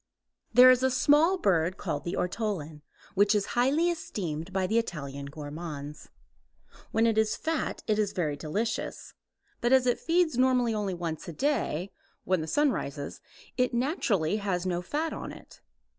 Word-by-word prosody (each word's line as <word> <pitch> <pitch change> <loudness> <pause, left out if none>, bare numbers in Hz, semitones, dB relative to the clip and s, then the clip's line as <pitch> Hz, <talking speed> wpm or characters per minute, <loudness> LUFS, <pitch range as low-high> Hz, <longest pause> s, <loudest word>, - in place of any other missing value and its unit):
There 255 +1 +9
is 255 0 +3
a 260 - +3
small 295 +8 +4
bird 185 - +1
called 145 -8 -4
the 170 - -2
ortolan, 180 -6 -3 0.3
which 205 +2 +4
is 205 -1 +1
highly 285 +8 +3
esteemed 180 - -4
by 190 0 0
the 220 +5 +2
Italian 140 -9 -5
gourmands. 150 0 -7 0.8
When 225 +1 +3
it 225 -1 +3
is 220 0 +2
fat 320 -3 -2
it 215 -1 +1
is 205 -2 +1
very 155 -5 -1
delicious, 205 +10 -3 0.5
but 240 - +1
as 260 -1 +5
it 245 - +1
feeds 330 -5 +1
normally 250 -3 +3
only 205 -3 -2
once 165 -3 -5
a 170 - -6
day, 200 - -1 0.3
when 185 -3 +1
the 155 - -5
sun 290 - +3
rises, 140 - -5 0.4
it 250 -1 +1
naturally 230 - +1
has 190 -4 -2
no 175 -1 -1
fat 300 - -2
on - - -6
it. - - -14
205 Hz, 165 wpm, -28 LUFS, 165-255 Hz, 0.8 s, There